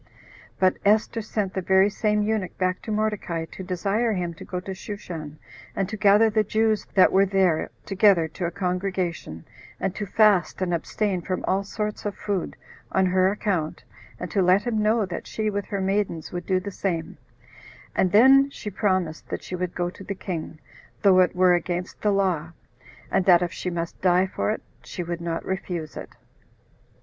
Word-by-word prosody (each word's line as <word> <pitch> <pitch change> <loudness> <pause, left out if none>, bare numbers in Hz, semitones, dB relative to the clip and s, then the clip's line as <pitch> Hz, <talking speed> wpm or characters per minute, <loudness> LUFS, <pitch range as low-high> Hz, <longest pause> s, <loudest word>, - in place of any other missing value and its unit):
But 185 -1 +3
Esther 215 +2 +2
sent 210 -2 -3
the 190 - -2
very 190 +3 +4
same 210 0 +1
eunuch 210 -3 -2
back 185 0 0
to 220 - -6
Mordecai 210 -6 -1
[to 190 - -8
desire 200 +5 0
him] 175 -3 -2
to 155 - -11
go 180 - -4
to 190 +1 -6
Shushan, 170 -6 -7 0.4
and 195 - 0
to 215 - -4
gather 210 +1 +5
the 215 0 +2
Jews 220 +1 +1
that 190 - +6
were 195 +1 +4
there 185 -4 +2 0.2
together 195 -4 +4
to 175 +3 -4
a - - -1
congregation, 180 - -3 0.3
and 185 - -1
to 210 0 -5
fast 205 -3 +3
and 185 -2 -1
abstain 185 +2 -1
from 185 +1 -3
all 195 +1 +1
sorts 210 +1 -4
of 205 - -4
food, 200 -4 -3 0.4
on 190 0 +3
her 185 0 +3
account, 190 -7 -2 0.4
and 180 - -5
[to 200 - +2
let 185 +3 +4
him 225 -3 0
know 215 0 +2
that] 180 - -6
she 215 -1 -2
with 200 -1 -2
her 200 -3 -3
maidens 190 -4 -1
would 175 -1 -5
do 185 -1 +2
the 200 +2 -6
same: 170 -4 -3 0.8
and 185 - +2
then 270 +6 +7
she 210 -6 -7
promised 185 -5 -1
that - - -4
she 185 - -5
would 180 -1 -3
go 175 0 -1
to 190 - -12
the 200 - -5
king, 170 -4 -5 0.5
though 190 -2 +6
it 180 -1 +3
were 180 0 +5
against 175 +1 -2
the 210 - +2
law, 180 -5 0 0.6
and 190 - +2
that 180 -2 +6
if 175 0 -3
she 180 - -4
must 170 -1 -5
die 180 0 +4
for 190 - -2
it, 215 - -2 0.2
she 180 - -5
would 170 0 -4
not 165 -1 -3
refuse 180 -4 -4
it. - - -7
190 Hz, 190 wpm, -25 LUFS, 180-205 Hz, 0.8 s, then